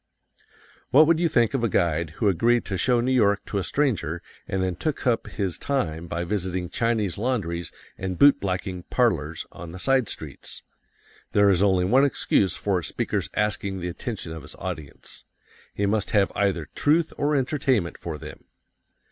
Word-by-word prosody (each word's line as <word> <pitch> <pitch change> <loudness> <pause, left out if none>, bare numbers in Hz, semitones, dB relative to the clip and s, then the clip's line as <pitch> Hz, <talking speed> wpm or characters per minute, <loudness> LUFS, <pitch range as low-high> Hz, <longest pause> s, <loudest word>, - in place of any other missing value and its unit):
What 150 +4 +7
would 165 +1 +3
you 170 -1 +2
think 120 -5 +2
of 130 -4 0
a 115 - +2
guide 85 -3 0
who 110 - +1
agreed 115 +6 +3
to 95 - -3
show 120 +6 +2
New 125 +2 0
York 105 -6 +3
to 100 - -2
a - - -2
stranger 90 - -1 0.2
and 95 - -2
then 90 -1 -1
took 150 - -3
up 115 -3 +1
his 95 -4 -3
time 85 - -2
by 85 +1 -3
visiting 90 -2 -2
Chinese 110 -5 0
laundries 90 -9 -2 0.3
and 95 -1 -3
boot 145 +6 +6
blacking 90 -1 -3
"parlors" 85 - +1
on 85 -1 -9
the - - -7
side 130 +2 +2
streets? 75 -3 -5 0.7
There 100 -1 +5
is 95 -1 +2
only 95 -3 +3
one 125 +8 +4
excuse 105 -8 +2
for 100 -3 0
a - - -8
speaker's - - -2
asking 100 -2 -1
the 90 0 -3
attention 100 -2 -5
of 80 -1 -6
his 75 - -11
audience: 75 -3 -7 0.5
He 100 - -1
must 105 0 0
have 100 -4 +3
either 100 -6 0
truth 155 +2 +2
or 145 +1 +1
entertainment 130 - 0
for 80 -3 -5
them. - - -11
100 Hz, 180 wpm, -25 LUFS, 85-120 Hz, 0.7 s, What